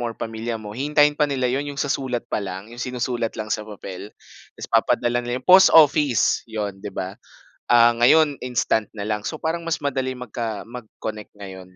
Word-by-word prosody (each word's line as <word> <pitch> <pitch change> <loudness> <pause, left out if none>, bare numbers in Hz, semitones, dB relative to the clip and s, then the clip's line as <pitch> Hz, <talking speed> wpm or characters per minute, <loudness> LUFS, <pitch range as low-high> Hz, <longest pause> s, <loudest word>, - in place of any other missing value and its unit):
mo 120 - -2
or 115 - -8
pamilya 115 +1 -4
mo, 105 -1 -9
hihintayin 145 +4 +3
pa 150 -1 +2
nila 130 -2 0
'yon, 145 +2 -2
'yong 140 0 -5
sa 140 -1 0
sulat 125 -3 -3
pa - - -1
lang, 100 +3 -7
'yong 120 - -9
sinusulat 120 -2 -3
lang 110 0 -4
sa - - -1
papel. 100 -1 -8 0.5
Ta's - - -8
papadala 120 0 +2
nila 120 +1 -3
'yun - - -31
post 190 +1 +8
office, 145 -6 +4
'yon, 105 -3 -4
'di 105 - -6
ba, 95 -1 -5 0.6
ah, 120 -1 +6
ngayon 145 +3 +4
instant 120 -3 0
na 100 - -5
lang. 105 0 -3
So, 155 - -4
parang 165 +1 -2
mas 160 -3 -2
madaling 130 -2 -2
magka 115 -3 -5
mag-connect 110 -3 -8
ngayon, 95 -2 -11
120 Hz, 200 wpm, -22 LUFS, 105-135 Hz, 0.6 s, post